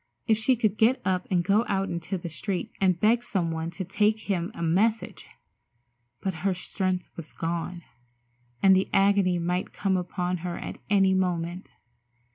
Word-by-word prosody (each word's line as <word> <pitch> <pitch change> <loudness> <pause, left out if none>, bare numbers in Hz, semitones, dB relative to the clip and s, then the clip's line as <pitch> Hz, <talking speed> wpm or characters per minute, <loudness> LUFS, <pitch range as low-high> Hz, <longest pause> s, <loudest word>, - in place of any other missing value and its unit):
If 220 -2 +2
she 250 +3 +3
could 215 -3 0
get 235 +4 +4
up 185 -1 0
and 180 -2 +2
go 205 +5 +3
out 195 -1 0
into 170 +3 -3
the 170 - -6
street 180 +3 -4
and 185 -3 +3
beg 230 +4 +3
some 180 -8 -1
one 160 0 -3
to 180 +2 -6
take 210 +4 +1
him 185 -2 -2
a 170 - -4
message! 210 +7 0 0.9
But 190 - -1
her 195 0 +1
strength 185 0 -2
was 165 -2 -9
gone, 170 +1 -3 0.8
and 190 -1 +7
the 190 - +1
agony 195 -2 +3
might 180 +2 -2
come 195 -2 0
upon 180 0 -2
her 175 0 -5
at - - -7
any 195 -2 +4
moment. 180 -1 -1
185 Hz, 170 wpm, -27 LUFS, 175-200 Hz, 0.9 s, and